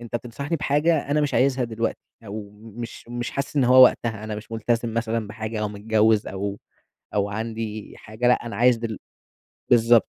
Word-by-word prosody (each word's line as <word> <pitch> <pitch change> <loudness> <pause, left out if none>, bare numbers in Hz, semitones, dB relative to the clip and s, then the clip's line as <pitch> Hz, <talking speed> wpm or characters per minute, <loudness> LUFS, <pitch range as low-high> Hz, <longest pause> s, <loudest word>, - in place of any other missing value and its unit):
أنتَ 120 0 -4
تنصَحني 140 +7 -4
بحاجة 150 +1 +1
أنا 150 +1 +3
مش 145 - 0
عايزها 130 -1 +2
دلوقتي، 115 0 -2 0.3
أو 100 0 -7
مش 115 +3 -9
مش 120 0 -4
حاسس 140 +2 -4
إن 135 - +4
هو 130 +1 +8
وقتها، 110 -3 +3
أنا 110 -1 -4
مش 105 +2 -10
ملتزم 115 +1 -1
مثلًا 115 -1 -1
بحاجة 110 +1 -5
أو 105 - -1
متجوّز 110 +1 +2
أو 100 +1 -4 0.6
أو 100 -1 +1
عندي 110 0 -5
حاجة، 115 +3 -2
لأ 125 - +2
أنا 115 - -5
عايِز 125 0 +5
دل 115 -2 -4 0.7
بالضبط. 115 -1 +5
115 Hz, 175 wpm, -24 LUFS, 110-120 Hz, 0.7 s, هو